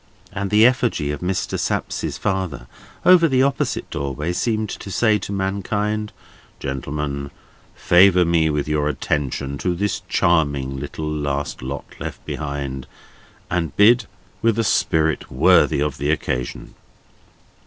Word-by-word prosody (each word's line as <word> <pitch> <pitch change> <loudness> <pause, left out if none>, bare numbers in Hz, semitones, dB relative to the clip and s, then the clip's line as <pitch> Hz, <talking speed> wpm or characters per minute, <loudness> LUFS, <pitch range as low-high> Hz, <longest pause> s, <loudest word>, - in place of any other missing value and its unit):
and 100 0 -3
the 105 +2 +5
effigy 120 - +2
of 75 - -4
Mr. 90 +1 -2
Sapsea's - - -2
father 95 -10 -2 0.4
over 180 -2 +7
the 130 -3 +3
opposite 140 0 -1
doorway 75 +3 -3
seemed 110 +2 0
to 100 - -7
say 105 +2 +2
to 95 - -6
mankind: 105 +2 -2 0.5
"Gentlemen, 70 +1 -4 0.5
favour 90 0 +5
me 85 -2 +2
with 75 -1 -1
your 75 -1 +1
attention 70 -1 -2
to 90 -1 -1
this 100 +3 -1
charming 70 -6 +1
little 75 +3 -5
last 70 -4 -3
lot 65 +2 -5
left - - -7
behind, 70 -3 -4 0.6
and 85 -5 -2
bid 110 +1 +5 0.3
with 115 -1 +2
a 115 - +2
spirit 80 -6 +1
worthy - - +4
of 75 -2 -2
the 70 +2 -1
occasion!" 65 -5 -2
80 Hz, 130 wpm, -21 LUFS, 70-100 Hz, 0.6 s, over